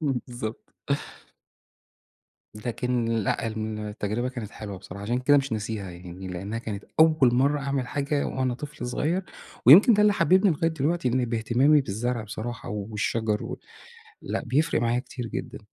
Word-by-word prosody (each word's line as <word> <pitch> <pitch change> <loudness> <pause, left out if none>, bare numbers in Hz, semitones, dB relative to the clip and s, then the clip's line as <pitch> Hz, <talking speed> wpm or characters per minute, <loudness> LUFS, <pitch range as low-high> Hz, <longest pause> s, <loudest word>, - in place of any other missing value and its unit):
بالضبط. 125 -6 -4 1.8
لكن 120 +2 -2
لأ، 115 -1 0
التجربة 110 +1 -3
كانت 120 -5 -6
حلوة 100 -4 -7
بصراحة، 100 +1 -9
عشان 120 +4 0
كده 145 +3 +4
مش 135 -3 0
ناسيها، 105 -3 -3
يعني 90 +2 -9
لأنها 100 +5 -4
كانت 105 -3 -6 0.2
أول 155 -6 +5
مَرَّة 140 +3 +2
أعمل 135 -2 -1
حاجة 145 +1 -1
وأنا 130 -2 -1
طفل 145 -2 -7
صغير، 160 +9 0 0.4
ويمكن 200 - +9
ده 210 - +4
اللي 210 -1 +5
حببني 190 0 +4
لغاية 165 +1 +1
دلوقتي 160 -1 0
إني 125 +1 +1
باهتمامي 120 +6 +3
بالزرع 120 +1 -2
بصراحة 115 +2 -6
والشجر 105 +1 -1
و - - -6 0.6
لأ، - - -3
بيفرق 150 +5 +1
معايا 120 +1 +1
كتير 125 -1 -6
جدًا. 130 +4 -5
120 Hz, 145 wpm, -26 LUFS, 110-140 Hz, 1.8 s, ويمكن